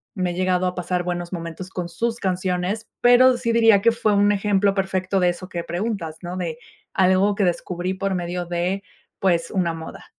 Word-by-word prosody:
me 185 -3 -1
he - - -3
llegado 185 0 +1
a 180 - -3
pasar 180 0 -1
buenos 175 0 -4
momentos 170 +2 -6
con 175 -2 -4
sus 230 +7 -2
canciones, 185 +2 -1
pero, 245 +1 +6
sí 240 -1 -1
diría 225 -3 +5
que 230 - +5
fue 220 -2 +1
un 205 0 +4
ejemplo 200 -1 +2
perfecto 190 0 0
de 180 -1 +3
eso 175 +1 -5
que 170 -2 -4
preguntas, 175 -3 -3
¿no? 180 0 -5
De 165 -3 -4 0.3
algo 190 +2 +3
que 200 - 0
descubrí 180 +1 -2
por 195 0 -2
medio 175 0 -3
de, 175 +3 -2 0.3
pues, 170 -3 +1
una 175 -3 0
moda. 160 0 -9
185 Hz, 195 wpm, -22 LUFS, 175-200 Hz, 0.3 s, pero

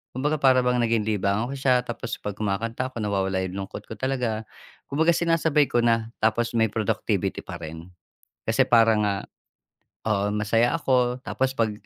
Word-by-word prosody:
kumbaga, 150 +4 0
para 130 -2 +4
bang 125 0 +2
naging 115 -2 +2
libangan 105 +2 0
ko 140 - -4
siya, 130 -2 +3
tapos 120 -1 -5
pag 105 -1 -4
kumakanta 115 +5 -2
ako, 115 - -4
nawawala 95 -2 0
’yung 95 +1 -5
lungkot - - -8
ko 110 - -6
talaga. 125 -5 -1 0.4
Kumbaga, 160 +4 +3
sinasabay 160 -4 +2
ko 120 - +1
na, 115 -1 +1
tapos 115 +2 +1
may 115 -1 +3
productivity 110 -2 -1
pa - - -7
rin. 80 +2 -9 0.6
Kasi - - +3
parang 115 -2 +5
nga 100 - 0 0.9
oo, 105 -1 +1
masaya 110 +3 +2
ako 125 -4 +1
tapos 130 0 -1
'pag, 115 -3 +1
115 Hz, 165 wpm, -25 LUFS, 105-130 Hz, 0.9 s, parang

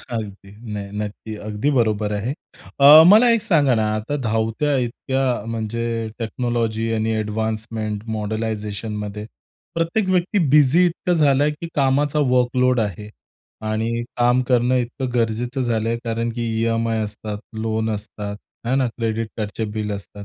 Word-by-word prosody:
अगदी. 105 -5 -7 0.2
नाही 100 -1 -5
नक्की, 105 +1 -5
अगदी 105 +6 -2
बरोबर 110 -5 +1
आहे. 105 +5 -2 0.5
अ, 150 +3 +10
मला 235 +3 +7
एक 220 - -4
सांगा 150 - +3
ना 110 -1 +1
आता 110 +7 -2
धावत्या 115 +6 0
इतक्या 125 -1 -1
म्हणजे 115 0 -3 0.3
टेक्नॉलॉजी 115 -1 -1
आणि 110 0 0
एडवान्समेंट 110 0 -3
मॉडलायझेशनमध्ये 105 -1 -4 0.5
प्रत्येक 165 +5 0
व्यक्ती 185 +2 +1
बिझी 150 +5 +5
इतकं 180 +1 -1
झालं 145 -4 +3
आहे, 150 - +1
की 165 +3 -7
कामाचा 145 +2 +2
वर्कलोड 125 0 +2
आहे 105 -1 -3 0.6
आणि 115 +2 -1
काम 120 +1 +3
करणं 125 0 +3
इतकं 125 +1 -2
गरजेचं 120 +3 -1
झालं 115 -3 0
आहे 115 0 -1
कारण 115 0 -1
की 120 - -3 0.2
ई-एम-आय 115 -1 0
असतात, 105 0 -5 0.2
लोन 110 0 -1
असतात. 105 -1 -5 0.3
आहे 125 +3 +1
ना 135 -2 +2
क्रेडिट 115 -1 -3
कार्डचे 110 +1 -3
बिल 105 -1 -2
असतात. 100 +1 -8
115 Hz, 140 wpm, -21 LUFS, 110-130 Hz, 0.6 s, अ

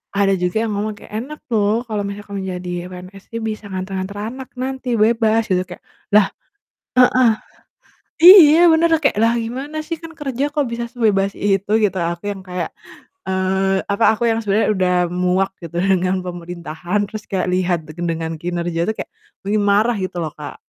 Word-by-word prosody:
ada 200 -1 +3
juga 180 +1 -1
yang 220 - -2
ngomong 210 +1 -2
kayak, - - -15
"Enak 300 +6 -8
loh 215 +1 +2
kalau 210 -3 -2
misalkan 200 0 -7
menjadi 180 -1 -5 0.2
PNS 185 +2 -11
nih, 230 - -4
bisa 215 -1 -4
nganter-nganter 190 +1 -4
anak 255 +5 -6
nanti, 260 0 -4
bebas 225 0 +3
gitu," 185 0 +2
kayak, 180 - -11 0.3
lah 210 -2 +6 0.7
heeh, 250 -1 +5 0.9
iya 335 -4 +10
bener, 320 +1 +4
lah 320 - +3
kayak 280 - +2
lah 230 +1 +4
gimana 260 +7 -4
sih 330 0 -3
kan 330 -1 -10
kerja 275 -4 -3
kok 295 -2 +1
bisa 235 0 -3
sebebas 205 -5 +1
itu 200 0 0
gitu, 190 -2 +1
aku 170 +1 -2
yang 195 -1 -7
kayak, 180 -1 -3 0.6
eee, 190 +1 +1
apa 200 +3 0
aku 235 - -4
yang 225 0 +1
sebenernya 210 +1 +1
udah 185 -1 +1 0.2
muak 180 +2 +1
gitu 170 +1 -6
dengan 185 -1 +2
pemerintahan, 175 +1 -4
terus 215 +1 -7
kayak 185 -2 0
lihat 180 -1 +1
dengan 165 0 -3
kinerja 170 -1 -2
tuh 220 - -1
kayak, - - -6 0.3
pengin 205 +1 0
marah 210 +4 +3
gitu 185 -1 -4
loh 155 - -4
Kak. 150 -1 -9
200 Hz, 175 wpm, -19 LUFS, 180-230 Hz, 0.9 s, iya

